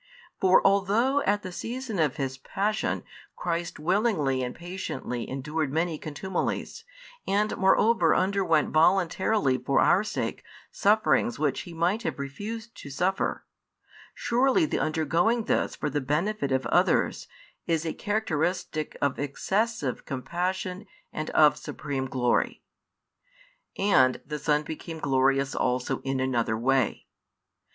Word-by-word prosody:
For 185 0 +4
although 210 +8 +3
at 205 +1 +2
the 185 - -6
season 230 +1 -4
of 150 -5 +2
His 135 -1 -3
Passion, 210 +8 -1 0.3
Christ 170 0 -3
willingly 160 - +1
and 125 -1 -4
patiently 175 -8 -5
endured 150 +2 -2
many 160 0 -1
contumelies, 190 - -3 0.4
and 210 +2 +1
moreover 190 -2 +4
underwent 185 -5 +2
voluntarily 175 -3 +2
for 135 - +1
our 195 - +4
sake 215 - -3 0.3
sufferings 215 +3 +2
which 145 -4 0
He - - -9
might 180 +7 +1
have 235 - -3
refused 210 +12 -6
to 145 - -9
suffer; 180 +8 -1 0.7
surely 265 +8 +2
the - - -1
undergoing 165 +9 +1
this - - 0
for - - -3
the 145 0 -1
benefit 150 +3 -1
of 130 0 +1
others - - +2 0.4
is 165 -1 0
a 160 - -2
characteristic 175 -6 -2
of 140 -2 0
excessive 150 - -1
compassion 180 +7 -3 0.3
and 155 0 -4
of 150 -1 +5
supreme 135 -3 -4
glory. 125 -2 0 1.1
And 130 -11 +4
the 150 -1 -5
Son 150 0 +1
became 160 +1 -7
glorious 135 -1 +1
also 125 0 -1
in 135 -1 -2
another 120 -4 0
way. 130 0 +1
165 Hz, 125 wpm, -27 LUFS, 140-200 Hz, 1.1 s, of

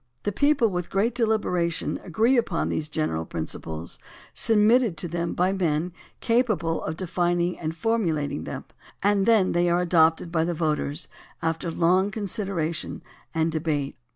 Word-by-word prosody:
The 205 - 0
people 285 +2 +3
with 180 -2 -3
great 210 +5 +1
deliberation 210 -8 0
agree 220 +9 +2
upon 225 -8 0
these 155 -1 -2
general 115 - -1
principles, 80 0 -4 0.3
submitted 225 -2 +4
to 175 - -2
them 170 0 -2
by 185 +2 +2
men 170 -2 0 0.3
capable 215 -9 +1
of 160 +1 -4
defining 175 -1 0
and 160 0 -4
formulating 160 - 0
them, - - -6 0.4
and 200 0 +3
then 220 -5 +4
they 175 0 +2
are 175 +1 +2
adopted 165 -1 +3
by 160 -2 +2
the 170 +1 -1
voters 155 -1 -1 0.4
after 165 +1 -1
long 180 +4 +2
con 205 +1 -5
sideration 190 -6 -2 0.3
and 160 0 +1
debate. 150 -3 -1
175 Hz, 150 wpm, -25 LUFS, 160-205 Hz, 0.4 s, submitted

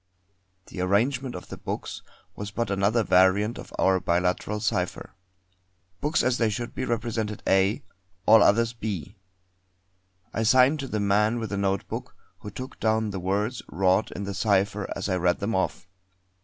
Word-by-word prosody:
The 90 - -6
arrangement 120 +7 +1
of 90 - -9
the - - -7
books - - -5 0.3
was 105 0 -5
but 110 0 -2
another 100 +4 +2
variant 95 +4 +3
of - - -10
our 95 0 +3
biliteral 90 +4 0
cipher. 105 - -2 0.9
Books 150 +2 +1
as 125 -1 +1
they 115 -2 +3
should 120 +3 -4
be, 130 - -3
represented 115 -3 -2
A; 95 +8 +2 0.4
all 110 0 +7
others 115 +3 +4
B. 100 -5 -5 1.2
I - - -1
signed 130 +6 +4
to 135 - -4
the 110 - -2
man 105 +3 +2
with 110 -3 -4
the 100 - -2
notebook, 100 -1 -2 0.2
who 105 - -8
took 130 +6 -8
down 110 -1 +1
the 95 - -4
words 105 +6 -1
wrought 95 +3 +2
in 100 - -5
the 100 0 -4
cipher 100 0 0
as - - -3
I 95 -2 0
read 90 0 +2
them 105 +3 -2
off. 95 - -1
105 Hz, 165 wpm, -26 LUFS, 95-115 Hz, 1.2 s, all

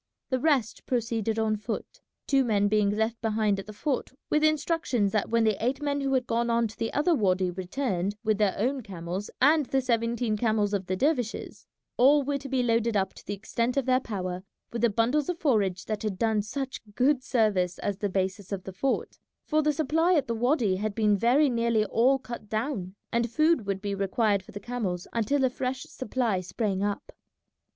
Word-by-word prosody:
The 260 - +2
rest 265 -6 0
proceeded 230 -3 -1
on 220 -1 +1
foot, 215 +2 -6 0.2
two 275 -1 +3
men 205 -4 +2
being 210 -1 +2
left 220 +2 -1
behind 215 -3 +1
at 195 - -8
the - - -7
fort 255 +6 -2 0.2
with 305 0 +3
instructions 310 - +1
that 215 -1 0
when 230 0 +3
the 220 -1 +1
eight 255 +3 0
men 285 -1 -1
who 270 -1 +1
had 255 -1 +1
gone 235 0 0
on 235 0 +2
to 220 - -12
the 225 - -2
other 320 +4 +2
wady 185 - +2
returned 190 +1 -2
with 215 -1 +1
their 205 -3 +2
own 260 +6 0
camels 185 -1 -5
and 290 +2 +4
the 270 - +1
seventeen 235 -2 0
camels 215 -2 +1
of 190 -2 -1
the 185 - 0
dervishes, 250 -1 -1 0.3
all 280 +4 +5
were 280 +1 -1
to 275 0 -8
be 260 -1 +1
loaded 230 -2 +2
up 190 -1 0
to - - -14
the 205 - -4
extent 230 +5 -2
of 275 - +1
their 255 0 +3
power 185 -6 -4 0.3
with 235 - -3
the 235 - +4
bundles 245 - +1
of 355 - -1
forage 205 - +1
that 215 -1 -3
had 210 -4 -2
done 220 0 +1
such 265 +5 -5
good 265 +1 +3
service 205 -8 +1
as 200 -2 -2
the 205 - -1
basis 190 +1 -2
of 195 -2 -3
the 190 - -8
fort, 265 +8 -2 0.3
for 310 0 +2
the 300 0 +2
supply 320 +4 +2
at 290 - +2
the 235 - -2
wady 230 -4 +1
had 210 +1 -3
been 210 -2 +3
very 250 +9 +4
nearly 230 -3 +1
all 245 +6 +3
cut 240 -5 -9
down, 215 -5 -3 0.2
and 235 0 +1
food 310 -3 +2
would 195 0 -2
be 200 -1 -2
required 200 +1 +1
for - - -15
the 205 - -7
camels 205 -6 -3
until 235 +5 +1
a - - +3
fresh 255 0 -3
supply 240 -5 -2
sprang 195 +1 -2
up. 205 0 -2
230 Hz, 210 wpm, -27 LUFS, 205-260 Hz, 0.3 s, all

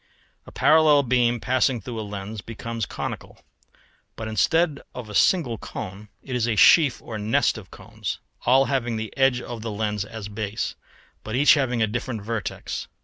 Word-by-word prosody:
] - - -39
A - - -10
parallel 155 -2 +5
beam 120 -1 +2
passing 130 +1 +1
through 115 +2 -6
a - - -2
lens 105 0 -6
becomes 115 0 -5
conical; - - -6 0.8
but 110 - -6
instead 140 - +1
of 120 -3 -7
a - - -8
single 125 - +2
cone 105 0 -7
it 130 - -5
is 120 -1 +1
a 115 - +1
sheaf 140 - +6
or 110 -2 -6
nest 105 +2 +2
of - - -10
cones, - - -6 0.3
all 135 +2 +5
having 120 -4 -1
the 110 -1 -5
edge 135 -2 +3
of 120 -2 -7
the 115 - -4
lens 105 -1 -2
as 105 -1 -8
base, 105 0 -3 0.5
but 110 - -4
each 145 +3 +6
having 125 -6 +1
a - - +2
different 120 0 -4
vertex. 110 -1 -4
115 Hz, 180 wpm, -24 LUFS, 110-130 Hz, 0.8 s, sheaf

